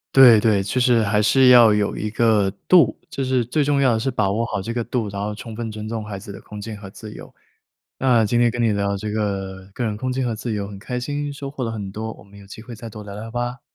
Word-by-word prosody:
对 125 -5 +8
对， 105 -3 +3
其 100 +6 -3
实 120 -2 +4
还 105 0 +2
是 130 +5 +4
要 120 -4 +8
有 105 -1 0
一 105 - -3
个 110 -3 +2 0.2
度， 180 -3 +5
就 135 - -3
是 130 -2 +1
最 145 +6 0
重 140 0 +1
要 130 -3 +4
的 110 - 0
是 135 +3 -1
把 100 -5 0
握 110 +4 0
好 100 -4 -3
这 115 +4 -4
个 120 - -1
度， 115 -2 -2
然 100 0 -5
后 105 - -3
充 110 +1 -9
分 115 -1 -4
尊 110 0 -7
重 110 -1 -4
孩 105 -2 -6
子 100 +1 -9
的 - - -10
空 105 -1 -10
间 110 +1 -6
和 100 -1 -10
自 105 +2 -10
由。 - - -12 0.7
那 120 -4 +3
今 120 +3 +1
天 120 0 +4
跟 120 +1 -5
你 115 - +3
聊 100 -1 -1
这 105 +1 -4
个 95 -3 -3
个 120 - -2
人 105 - -2
空 130 +4 -3
间 130 0 -1
和 120 - -1
自 115 +2 -5
由 100 -1 -3
很 100 -1 -9
开 125 +4 -4
心， 145 +3 -3
收 140 -1 -7
获 140 -2 -5
了 115 - -2
很 100 -3 -5
多， 110 +2 -5
我 - - -16
们 100 0 -16
有 100 - -15
机 110 +3 -11
会 120 0 -10
再 115 +1 -9
多 105 -1 -9
聊 100 -1 -9
聊 110 +3 -7
吧。 120 +3 -3
110 Hz, 310 characters per minute, -21 LUFS, 105-125 Hz, 0.7 s, 对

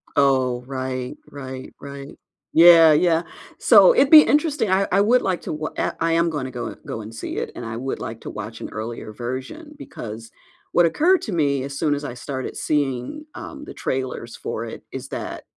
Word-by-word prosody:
Oh, 130 -3 +2
right, 130 -1 -4
right, 130 -2 -8
right. 140 0 -9 0.4
Yeah, 165 -1 +8
yeah. 165 +1 +3 0.4
So, - - +7
it'd 285 - +4
be 310 -1 +11
interesting, 295 - +1
I 195 +1 +2
I 195 - +4
would 240 +5 +4
like 185 -2 -1
to - - -5
wa 155 +1 -4
I - - 0
I 165 0 +1
am 170 +1 +2
gonna 140 -5 -4
go 120 -1 -5
go 110 - -5
and 110 +1 -9
see 110 - -6
it - - -3
and 120 - -7
I 115 0 -5
would 130 +2 -4
like 115 0 -6
to - - -7
watch 110 +1 -7
an - - -6
earlier 110 0 -6
version 130 - -6
because 115 - -9 0.4
what 175 - +4
occurred 345 - +3
to 215 - -4
me 140 -5 +1
as 140 0 -6
soon 145 -1 +1
as 145 - -6
I 135 - -5
started 130 +1 -6
seeing, 145 - -2
um, 295 -2 -8
the - - -9
trailers 130 -3 -4
for - - -5
it - - -9
is - - -6
that, - - -6
140 Hz, 200 wpm, -22 LUFS, 125-175 Hz, 0.4 s, be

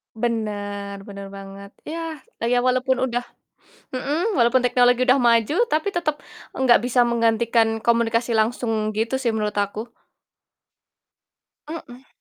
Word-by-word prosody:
Bener, 205 -3 -3
bener 200 -1 -8
banget. 195 +1 -10 0.2
Ya, 325 -2 -5 0.2
ya 245 +1 +2
walaupun 255 +1 +1
udah 245 -1 -1 0.7
mhm, 310 - -1
walaupun 240 0 +4
teknologi 245 +1 +3
udah 260 +2 +5
maju, 235 +4 +3 0.2
tapi 315 +6 0
tetep 305 -4 -1 0.4
nggak 250 -3 +5
bisa 245 0 +3
menggantikan 230 -1 +2
komunikasi 235 +1 +1
langsung 220 -1 0
gitu 225 +4 -2
sih 235 - +2
menurut 210 -2 -2
aku. 210 +3 -3 1.7
Mhm. 265 -5 -9
235 Hz, 120 wpm, -22 LUFS, 220-255 Hz, 1.7 s, udah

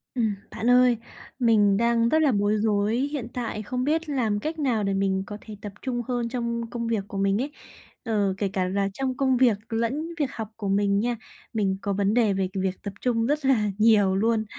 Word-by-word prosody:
Ừm, 220 -4 +1 0.2
bạn 235 - -1
ơi, 250 -1 +5 0.4
mình 210 -5 +4
đang 235 +1 +2
rất 315 - +3
là 295 -3 +4
bối 205 0 +2
rối, 210 0 +1
hiện 280 -2 -2
tại 230 -4 -3
không 250 +4 -2
biết 315 +3 0
làm 230 -7 0
cách 315 +8 -4
nào 245 -7 +1
để 195 0 0
mình 195 -1 0
có 205 - -6
thể 215 - -9
tập 205 -1 -7
trung 245 -2 -2
hơn 240 -2 -1
trong 235 -1 -3
công 235 -1 -3
việc 225 -3 0
của 200 - -6
mình 195 +2 +1
ấy. 285 +3 -3 0.5
Ờ, 210 -5 +1
kể 200 - 0
cả 185 -1 0
là 195 +1 0
trong 260 +3 -2
công 265 -2 +2
việc 240 -5 +4
lẫn 235 +8 -1
việc 280 -3 0
học 220 -4 -5
của 210 -3 -5
mình 200 0 +2
nha, 240 +3 0 0.4
mình 195 -4 0
có 200 - -1
vấn 200 +1 +1
đề 225 -4 +3
về 190 -1 -1
việc 190 -1 -2
tập 200 - -5
trung 230 -2 +1
rất 295 +2 0
là 220 -6 +3
nhiều 210 -3 +4
luôn. 220 +2 +1
225 Hz, 220 wpm, -25 LUFS, 200-250 Hz, 0.5 s, ơi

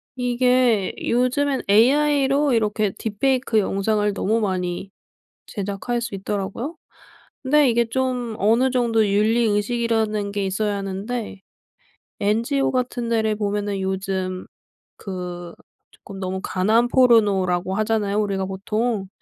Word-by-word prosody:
이게 245 -4 +2
요즘엔 255 +3 0
AI로 275 +4 +3
이렇게 215 -2 +1
딥 210 -3 -5
페이크 260 -4 +2
영상을 205 +1 0
너무 215 +3 0
많이 185 -1 -2 0.6
제작할 205 +4 -3
수 225 -4 -4
있더라고요. 205 - -4 0.7
근데 285 +1 +4
이게 235 0 +2
좀 250 -1 -2
어느 230 +6 +3
정도의 225 -5 +1
윤리 220 +3 +3
의식이라는 215 -1 0
게 200 -1 -2
있어야 205 +2 -1
하는데 200 +2 -5 0.8
NGO 230 +7 +1
같은 245 -2 -2
데를 220 -2 +1
보면은 205 -1 -2
요즘 190 -1 -3 0.5
그 180 -3 -7 0.4
쪼끔 195 -1 -12
너무 190 0 -3
가난 220 +6 +2
포르노라고 200 -8 +3
하잖아요 215 -1 0
우리가 195 -2 -1
보통. 210 +2 -2
215 Hz, 275 characters per minute, -22 LUFS, 195-245 Hz, 0.8 s, 근데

